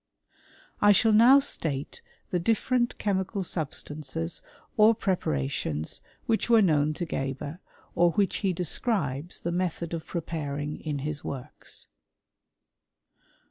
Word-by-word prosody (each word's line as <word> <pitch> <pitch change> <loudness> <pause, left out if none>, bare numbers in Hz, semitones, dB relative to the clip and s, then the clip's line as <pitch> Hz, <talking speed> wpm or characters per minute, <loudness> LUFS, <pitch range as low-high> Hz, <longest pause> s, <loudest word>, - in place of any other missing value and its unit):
I 205 0 +7
shall 225 +3 +4
now 240 +6 +8
state 155 - -1 0.3
the 180 - +1
different 240 +5 +1
chemical 195 0 -1
substances 150 - -3 0.4
®r 215 +1 +6
preparations 75 - -2 0.2
which 225 +1 0
were 230 -1 +7
known 155 -3 +2
to 175 - -3
Geber, 135 +2 -4 0.3
or 175 0 +4
which 200 -2 +1
he 195 -3 0
describes 170 - -1
the 170 - -2
method 175 -1 -2
of 165 -1 -4
preparing 150 -3 -4
in 150 -2 -3
his 150 -1 -2
works. 130 -3 -6
170 Hz, 115 wpm, -27 LUFS, 145-205 Hz, 0.4 s, now